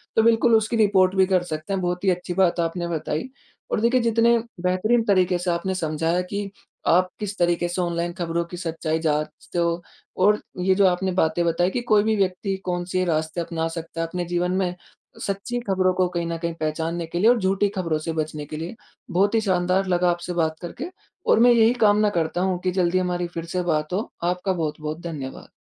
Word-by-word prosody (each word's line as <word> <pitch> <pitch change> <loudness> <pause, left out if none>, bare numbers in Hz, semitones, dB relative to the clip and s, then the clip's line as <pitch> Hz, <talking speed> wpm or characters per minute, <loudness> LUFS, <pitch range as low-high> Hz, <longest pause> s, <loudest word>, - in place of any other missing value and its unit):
तो 225 - +4
बिल्कुल 230 0 +4
उसकी 220 +1 +1
रिपोर्ट 195 -3 +4
भी 190 0 +5
कर 185 -1 +2
सकते 155 +2 -4
हैं, 195 - -1
बहुत 180 0 -2
ही 195 - +3
अच्छी 180 0 -1
बात 180 -2 +2
आपने 170 +1 -1
बताई। 160 - -3 0.4
और - - +1
देखिए, 235 +3 +3
जितने 235 0 +4 0.2
बेहतरीन 200 +6 +2
तरीके 185 -4 +3
से 175 0 0
आपने 180 +2 -1
समझाया 165 +1 0
कि 200 +2 -4 0.4
आप 185 +2 +4
किस 205 -1 -4
तरीके 175 0 +1
से 175 +1 -2
ऑनलाइन 170 0 -1
खबरों 170 -1 -2
की 175 +1 -9
सच्चाई 165 -2 -2
जाँचते 155 +2 -2
हो 170 0 0 0.4
और 210 +2 +5 0.2
ये 190 +1 +3
जो 200 0 +4
आपने 185 +1 +1
बातें 160 +2 +2
बताई 170 +2 +2
कि 245 - -2
कोई 210 -1 +6
भी 220 0 +2
व्यक्ति 195 0 0
कौन-से 180 0 -1
रास्ते 160 0 -1
अपना 165 -1 -2
सकता 165 0 -5
है 165 - -1
अपने 175 +1 -3
जीवन 175 +1 0
में 180 -1 -1 0.5
सच्ची 200 +5 -2
खबरों 185 -1 +2
को 185 0 +2
कहीं 170 -1 -2
न 165 0 -2
कहीं 170 0 -3
पहचानने 160 +2 -2
के 170 +1 -3
लिए 215 +5 +5
और 245 -1 +4
झूठी 195 +1 +1
खबरों 165 -4 0
से 165 +1 -3
बचने 155 -1 -3
के 155 - -7
लिए। 165 +6 -5 0.4
बहुत 200 +5 +2
ही 225 - +3
शानदार 185 -1 +1
लगा 180 0 +2
आपसे 175 +1 -4
बात 160 -2 0
करके। 250 - -6 0.4
और - - +5
मैं 245 +1 +7
यही 230 0 +5
कामना 210 -3 +4
करता 170 -2 -1
हूँ, 185 -1 0
कि 185 0 -1
जल्दी 180 -1 +1
हमारी 180 -1 -1
फिर 170 -1 -6
से 180 - +2
बात 155 -1 -1
हो। 205 +5 -2
आपका 180 +2 0
बहुत-बहुत 155 -1 -3
धन्यवाद। 150 -6 -6
180 Hz, 210 wpm, -23 LUFS, 170-195 Hz, 0.5 s, मैं